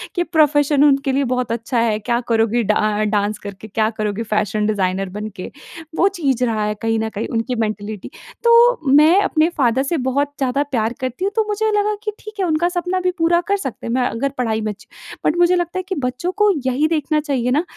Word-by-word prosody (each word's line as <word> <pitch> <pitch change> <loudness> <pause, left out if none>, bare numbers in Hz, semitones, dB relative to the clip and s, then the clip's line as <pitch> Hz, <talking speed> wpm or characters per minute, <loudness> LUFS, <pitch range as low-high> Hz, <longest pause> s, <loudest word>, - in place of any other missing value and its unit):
कि 350 - +1
प्रोफेशन 295 -3 +3
उनके 275 -1 +3
लिए 275 +1 +1
बहुत 250 -2 -2
अच्छा 230 +1 -1
है, 225 -2 +1
क्या 235 +2 -1
करोगी 230 +1 +2
डा 215 0 +1
डांस 210 0 0
करके 200 +1 -9
क्या 215 +1 0
करोगी 215 +1 -2
फैशन 210 -1 -1
डिज़ाइनर 195 -2 -1
बनके। 210 -1 -7 0.5
वो 385 - +4
चीज़ 265 -5 +1
रहा 220 -2 -1
है 210 0 -2
कहीं 225 0 0
न 220 0 -2
कहीं 215 0 -4
उनकी 235 +2 -1
मेंटालिटी। 215 -2 -4 0.3
तो 470 +1 +5
मैं 315 +6 +6
अपने 320 -3 +2
फादर 260 0 +2
से 330 +4 -1
बहुत 285 +2 0
ज़्यादा 270 +1 0
प्यार 240 -5 -1
करती 255 +8 -3
हूँ 400 - 0
तो 445 - +3
मुझे 430 +1 0
लगा 420 0 +1
कि 425 - -2
ठीक 430 0 -10
है 380 - +1
उनका 335 +2 +1
सपना 360 +1 -2
भी 365 0 0
पूरा 340 +1 +3
कर 400 0 +2
सकते 265 - -6
हैं 230 - -2
मैं 250 -1 +1
अगर 275 +5 -2
पढ़ाई 220 -3 -1
में 215 0 -2
अच्छी। 205 - -14 0.4
बट 310 - +2
मुझे 350 +1 +4
लगता 350 +1 -2
है - - -4
कि 380 - -2
बच्चों 255 +9 -2
को 420 0 +4 0.2
यही 265 +4 +1
देखना 310 -1 0
चाहिए 265 -5 -1
ना 295 +6 +2
260 Hz, 220 wpm, -19 LUFS, 220-335 Hz, 0.5 s, मैं